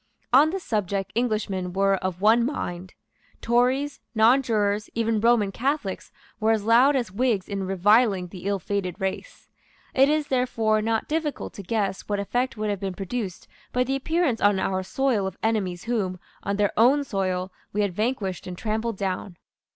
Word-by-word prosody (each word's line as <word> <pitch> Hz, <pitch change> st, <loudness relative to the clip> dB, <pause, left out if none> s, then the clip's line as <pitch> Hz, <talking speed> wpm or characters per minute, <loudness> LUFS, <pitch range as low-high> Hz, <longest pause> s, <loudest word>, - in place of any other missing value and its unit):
On 285 Hz, +5 st, +7 dB
this 375 Hz, +2 st, -4 dB
subject 200 Hz, -3 st, -2 dB
Englishmen 210 Hz, -6 st, -1 dB
were 195 Hz, 0 st, +2 dB
of 185 Hz, -1 st, -4 dB
one 225 Hz, +3 st, +5 dB
mind. 185 Hz, -9 st, -4 dB, 0.4 s
Tories, 255 Hz, +5 st, +1 dB, 0.2 s
Nonjurors, 220 Hz, -3 st, +3 dB
even 225 Hz, -1 st, +1 dB
Roman 230 Hz, -4 st, +3 dB
Catholics, 260 Hz, -4 st, -2 dB, 0.3 s
were 220 Hz, -, +1 dB
as 220 Hz, -2 st, +2 dB
loud 245 Hz, +6 st, +5 dB
as 240 Hz, -7 st, -1 dB
Whigs 220 Hz, -2 st, 0 dB
in 195 Hz, -2 st, -3 dB
reviling 195 Hz, +1 st, +3 dB
the 180 Hz, +1 st, -10 dB
ill 200 Hz, 0 st, +1 dB
fated 190 Hz, 0 st, -3 dB
race. 190 Hz, -, -5 dB, 0.5 s
It 270 Hz, +2 st, +5 dB
is, 305 Hz, -1 st, 0 dB
therefore, 225 Hz, -4 st, +1 dB
not 225 Hz, 0 st, -1 dB
difficult 310 Hz, -1 st, -2 dB
to -, -, -8 dB
guess 200 Hz, 0 st, -1 dB
what 205 Hz, -1 st, 0 dB
effect 245 Hz, +5 st, -1 dB
would 210 Hz, 0 st, -1 dB
have 200 Hz, -, -3 dB
been 190 Hz, -2 st, -4 dB
produced 195 Hz, -1 st, -5 dB, 0.2 s
by 250 Hz, -, +2 dB
the 265 Hz, +2 st, -1 dB
appearance 300 Hz, -3 st, 0 dB
on 205 Hz, -1 st, +4 dB
our 190 Hz, 0 st, 0 dB
soil 220 Hz, 0 st, 0 dB
of 190 Hz, -, -7 dB
enemies 195 Hz, -6 st, -1 dB
whom, 205 Hz, -6 st, -2 dB, 0.2 s
on 200 Hz, -, -2 dB
their 205 Hz, -1 st, +2 dB
own 265 Hz, +6 st, +4 dB
soil, 185 Hz, -5 st, -2 dB, 0.2 s
we 210 Hz, -, 0 dB
had 200 Hz, -3 st, 0 dB
vanquished 210 Hz, -4 st, -2 dB
and 180 Hz, -1 st, -6 dB
trampled 220 Hz, +1 st, -2 dB
down. 185 Hz, -2 st, -3 dB
215 Hz, 170 wpm, -25 LUFS, 195-245 Hz, 0.5 s, On